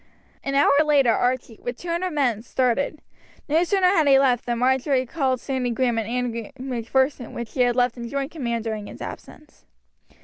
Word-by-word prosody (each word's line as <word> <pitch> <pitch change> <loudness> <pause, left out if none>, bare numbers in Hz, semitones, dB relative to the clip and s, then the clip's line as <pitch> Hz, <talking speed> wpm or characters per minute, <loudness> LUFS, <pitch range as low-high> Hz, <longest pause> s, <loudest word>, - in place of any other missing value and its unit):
An 275 - -2
hour 280 0 +5
later 285 -5 +4
Archie, 245 -2 -1
with 245 0 -5
two 350 - -8
hundred 345 +2 -1
men, 250 -8 +1
started. 260 +5 -1 0.4
No 315 +4 +3
sooner 380 +1 +1
had 325 -6 +3
he 270 -1 +7
left 255 -3 +2
than 240 -1 0
Marjory 260 +1 +2
called 260 -2 -1
Sandy 260 -2 -2
Grahame 240 -1 0
and 225 -1 -4
Andrew 235 -2 -3
Macpherson, 260 +1 -1
whom 235 - -4
he 250 - -3
had 245 -1 +3
left 245 -1 +1
in 235 -1 -6
joint 280 +2 -3
command 235 -7 -3
during 215 -2 -4
his - - -11
absence. 300 -1 -10
255 Hz, 190 wpm, -23 LUFS, 235-280 Hz, 0.4 s, he